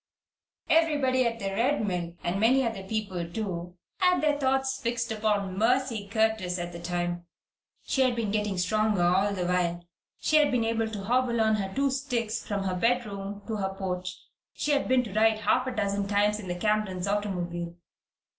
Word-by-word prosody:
Everybody 285 Hz, -6 st, +3 dB
at 230 Hz, 0 st, -2 dB
the 195 Hz, -3 st, -3 dB
Red 240 Hz, +5 st, +1 dB
Mill 175 Hz, -3 st, -3 dB
and 175 Hz, +3 st, -1 dB
many 255 Hz, +4 st, +4 dB
other 225 Hz, -4 st, -3 dB
people, 190 Hz, -4 st, -3 dB
too 180 Hz, -4 st, -4 dB, 0.2 s
had 360 Hz, -1 st, +3 dB
their 300 Hz, -1 st, +2 dB
thoughts 265 Hz, -1 st, 0 dB
fixed 235 Hz, -1 st, -1 dB
upon 210 Hz, -3 st, 0 dB
Mercy 235 Hz, -2 st, +1 dB
Curtis 220 Hz, -4 st, +1 dB
at 175 Hz, 0 st, -4 dB
this 170 Hz, 0 st, -7 dB
time. 175 Hz, -1 st, -2 dB, 0.6 s
She 270 Hz, -, 0 dB
had 255 Hz, -2 st, +3 dB
been 225 Hz, -3 st, -1 dB
getting 210 Hz, -2 st, -1 dB
stronger 210 Hz, +1 st, +1 dB
all 190 Hz, +4 st, +3 dB
the 185 Hz, -3 st, -2 dB
while. 175 Hz, -1 st, 0 dB, 0.3 s
She 310 Hz, -, +3 dB
had 300 Hz, -1 st, +5 dB
been 240 Hz, -3 st, +1 dB
able 225 Hz, 0 st, 0 dB
to 210 Hz, -3 st, -6 dB
hobble 240 Hz, +2 st, +1 dB
on 220 Hz, -1 st, +3 dB
her 195 Hz, -2 st, -3 dB
two 275 Hz, 0 st, +2 dB
sticks 245 Hz, -5 st, -2 dB
from 200 Hz, -2 st, -2 dB
her 190 Hz, -1 st, -1 dB
bedroom 205 Hz, -1 st, -1 dB
to 220 Hz, -2 st, -3 dB
the 190 Hz, -1 st, -1 dB
porch. 185 Hz, -1 st, -4 dB, 0.4 s
She 300 Hz, -, -1 dB
had 285 Hz, -1 st, +1 dB
been 255 Hz, -1 st, +3 dB
to 210 Hz, -5 st, -8 dB
ride 220 Hz, +1 st, +4 dB
half 250 Hz, +5 st, +2 dB
a -, -, -1 dB
dozen 200 Hz, -1 st, 0 dB
times 205 Hz, +1 st, +2 dB
in 200 Hz, -, -8 dB
the 175 Hz, -, -2 dB
Camerons' 200 Hz, -2 st, 0 dB
automobile. 175 Hz, -4 st, -2 dB
210 Hz, 185 wpm, -28 LUFS, 185-240 Hz, 0.6 s, had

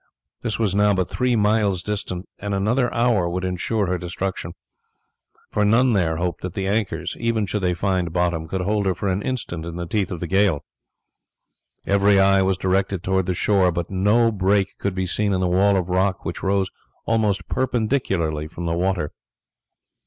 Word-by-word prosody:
This 115 Hz, -2 st, -2 dB
was 105 Hz, -4 st, +1 dB
now 105 Hz, 0 st, +3 dB
but 95 Hz, -1 st, -1 dB
three 125 Hz, -1 st, +1 dB
miles 105 Hz, -4 st, +2 dB
distant, 100 Hz, -3 st, -4 dB
and 100 Hz, 0 st, -3 dB
another 115 Hz, +6 st, +1 dB
hour 115 Hz, -7 st, +2 dB
would 90 Hz, +2 st, -3 dB
ensure 95 Hz, +4 st, -1 dB
her 90 Hz, 0 st, -1 dB
destruction; 90 Hz, -1 st, -4 dB, 1.0 s
for 105 Hz, -, +1 dB
none 115 Hz, +4 st, +4 dB
there 85 Hz, -5 st, +1 dB
hoped 85 Hz, 0 st, -2 dB
that 90 Hz, -1 st, -5 dB
the 95 Hz, -, -2 dB
anchors, 105 Hz, +1 st, -1 dB
even 115 Hz, -2 st, 0 dB
should 100 Hz, +2 st, -2 dB
they 90 Hz, -1 st, +1 dB
find 90 Hz, -2 st, 0 dB
bottom, 85 Hz, -2 st, 0 dB
could 95 Hz, +3 st, -2 dB
hold 100 Hz, +1 st, 0 dB
her 95 Hz, -, +1 dB
for 100 Hz, -, -3 dB
an 95 Hz, +2 st, 0 dB
instant 105 Hz, -9 st, -4 dB
in 85 Hz, 0 st, -6 dB
the 85 Hz, 0 st, -4 dB
teeth 100 Hz, +1 st, -1 dB
of 90 Hz, -, -4 dB
the 85 Hz, -, -3 dB
gale. 95 Hz, -3 st, +2 dB, 1.2 s
Every 100 Hz, 0 st, +4 dB
eye 95 Hz, 0 st, +5 dB
was 95 Hz, -1 st, +1 dB
directed 95 Hz, 0 st, 0 dB
towards 95 Hz, -1 st, 0 dB
the 90 Hz, -, 0 dB
shore, 95 Hz, -1 st, +3 dB
but 85 Hz, +1 st, -4 dB
no 105 Hz, +5 st, +3 dB
break 95 Hz, -1 st, +1 dB
could 100 Hz, -2 st, -2 dB
be 95 Hz, 0 st, -1 dB
seen 100 Hz, +3 st, 0 dB
in 95 Hz, -, +1 dB
the 90 Hz, -, +1 dB
wall 95 Hz, +3 st, +3 dB
of 90 Hz, -2 st, -1 dB
rock 95 Hz, +1 st, 0 dB
which 85 Hz, -, -4 dB
rose 95 Hz, -1 st, 0 dB, 0.3 s
almost 105 Hz, -4 st, +1 dB
perpendicularly 105 Hz, -, 0 dB
from 85 Hz, +2 st, -7 dB
the 85 Hz, -, 0 dB
water. 90 Hz, -3 st, 0 dB
95 Hz, 190 wpm, -22 LUFS, 90-105 Hz, 1.2 s, eye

